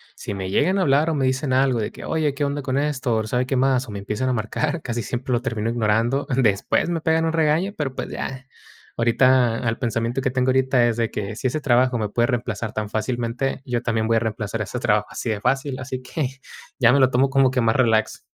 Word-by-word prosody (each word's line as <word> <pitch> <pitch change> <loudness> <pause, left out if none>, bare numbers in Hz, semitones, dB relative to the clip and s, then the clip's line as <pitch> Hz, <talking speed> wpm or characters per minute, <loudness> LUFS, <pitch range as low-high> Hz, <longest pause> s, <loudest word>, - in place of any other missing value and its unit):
Si 100 - -6
me 95 -1 -4
llegan 185 - +2
a 190 - +2
hablar, 145 +3 +3
o, 160 - 0
me 135 -2 +1
dicen 130 +1 0
algo 130 -2 +2
de 105 - -2
que: - - -10
"Oye, 155 -3 0
qué 145 - -2
onda 140 +1 -2
con 130 0 -2
esto, 140 -4 0
o 110 - 0
sabe 125 +3 -1
qué 135 - -1
más", 130 0 +2
o - - -8
me 100 - -5
empiezan 105 +6 -2
a - - +1
marcar, 145 +8 -2
casi 120 -1 -3
siempre 125 +4 -4
lo 120 - +1
termino 115 -3 -2
ignorando. 115 +4 +1
Después 120 0 +1
me 170 -2 -1
pegan 160 +1 +2
un 165 - 0
regaño, 165 +5 +1
pero, 135 -4 -3
pues - - -4
ya. 130 0 -5 0.5
Ahorita, 120 0 +3
al 115 - -1
pensamiento 115 +1 -1
que 130 - 0
tengo 130 0 +1
ahorita 130 -2 +3
es 115 -1 -1
de 115 -1 0
que 105 +1 -4
si 130 - -1
ese 155 +5 -1
trabajo 125 -2 +3
me 105 -1 -2
puede 120 +2 +1
reemplazar 115 -3 -2
tan 110 -1 -3
fácilmente, 120 +4 -2
yo 120 -2 -1
también 110 -2 0
voy 115 0 +3
a - - +4
reemplazar 110 -1 -3
ese 105 +4 -4
trabajo 105 -3 +1
así 115 - -5
de 105 - -2
fácil, 135 +1 0
así 130 0 -5
que 140 +2 -2 0.5
ya 120 -1 +6
me 140 - +4
lo 130 -1 +5
tomo 135 +2 +3
como 135 -1 +4
que 130 -1 +1
más 115 -1 +2
relax. 115 -4 +2
125 Hz, 245 wpm, -22 LUFS, 115-135 Hz, 0.5 s, ya